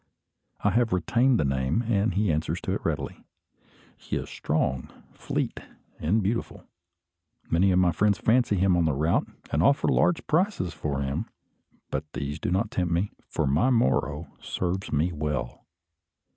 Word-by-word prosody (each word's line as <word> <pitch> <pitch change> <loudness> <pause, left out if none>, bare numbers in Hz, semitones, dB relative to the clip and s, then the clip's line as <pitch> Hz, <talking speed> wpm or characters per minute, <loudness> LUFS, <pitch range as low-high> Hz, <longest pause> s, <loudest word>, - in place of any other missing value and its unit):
I 105 - +3
have 115 0 +2
retained 120 +7 +3
the - - +2
name, 70 - 0
and 110 -4 +1
he 100 -3 +2
answers 75 +1 -1
to - - -3
it - - -2
readily. - - -3 0.7
He - - -5
is - - -4
strong, 65 -4 -1 0.2
fleet, - - -3 0.4
and 100 +8 +1
beautiful. 115 +5 -2 0.9
Many 90 +4 +4
of 90 - +3
my 90 -1 +4
friends 100 +2 +2
fancy 115 0 +2
him 95 -1 +3
on 85 -1 +2
the 80 - +2
route, 80 +4 +1 0.2
and 75 - +2
offer 140 +10 +3
large 175 -1 +2
prices 160 - +1
for 75 -3 -3
him; 70 0 -2 0.6
but 75 +2 -4
these 70 +1 -4
do - - -2
not 100 +5 0
tempt 90 -2 -1
me, 90 +4 0 0.2
for - - 0
my 75 - +3
Moro 75 - +1 0.2
serves 95 +2 -3
me 75 +5 +1
well. 75 -5 -4
90 Hz, 160 wpm, -27 LUFS, 75-110 Hz, 0.9 s, Many